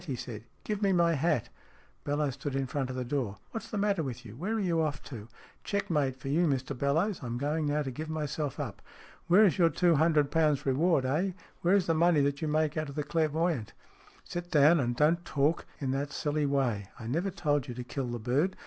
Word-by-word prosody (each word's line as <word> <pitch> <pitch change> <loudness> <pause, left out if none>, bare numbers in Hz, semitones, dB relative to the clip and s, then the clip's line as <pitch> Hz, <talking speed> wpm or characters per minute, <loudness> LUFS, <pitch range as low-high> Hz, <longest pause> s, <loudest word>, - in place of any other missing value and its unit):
he 135 - -2
said. 115 -3 -7
" - - -36
Give 210 -1 -3
me 200 -2 +3
my 170 -1 +3
hat! 150 -5 0 0.3
" - - -32
Bellowes 145 -1 0
stood 140 +1 -5
in 135 0 0
front 130 0 -2
of 130 - -4
the 130 -1 -3
door. 120 -6 -2
" - - -36
What's 225 - -6
the 215 - -3
matter 200 -3 +1
with 125 -4 -5
you? 110 -1 -10
Where 190 - -2
are - - 0
you 170 -5 +1
off 150 -2 -2
to?" 110 -6 -8 0.2
" - - -27
Checkmate 150 -10 0
for 130 +1 -10
you, 165 +5 +2
Mr 135 -1 -1
Bellowes. 160 - 0
I 125 - -5
am 120 +1 -3
going 150 +3 -1
now 150 +1 +1
to 135 - -4
give 155 +5 -6
myself 150 -2 -3
up. 130 -10 -5 0.5
Where 195 +5 +7
is 195 0 +2
your 170 -2 +6
two 170 +1 +3
hundred 155 -2 +3
pounds 150 -3 +2
reward, 140 +1 +2
eh? 170 +9 0 0.3
Where 180 +3 +4
is 195 -4 +3
the 165 - +2
money 165 -1 +4
that 140 0 0
you 160 - -1
make 155 0 +1
out 155 -2 -2
of 140 - -9
the 150 - -1
clairvoyant? 160 -5 0 0.2
" - - -27
" - - -27
Sit 175 0 -6
down, 155 +2 +5
and 120 -2 0
don't 160 +5 +3
talk 145 +1 0
in 135 -4 -1
that 140 +2 -2
silly 150 0 -1
way. 125 -8 0
I 115 - -8
never 165 - -1
told 145 -8 0
you 120 - -6
to 125 - -5
kill 130 +1 -4
the 120 0 -3
bird. 135 - 0
150 Hz, 250 wpm, -30 LUFS, 135-170 Hz, 0.5 s, Where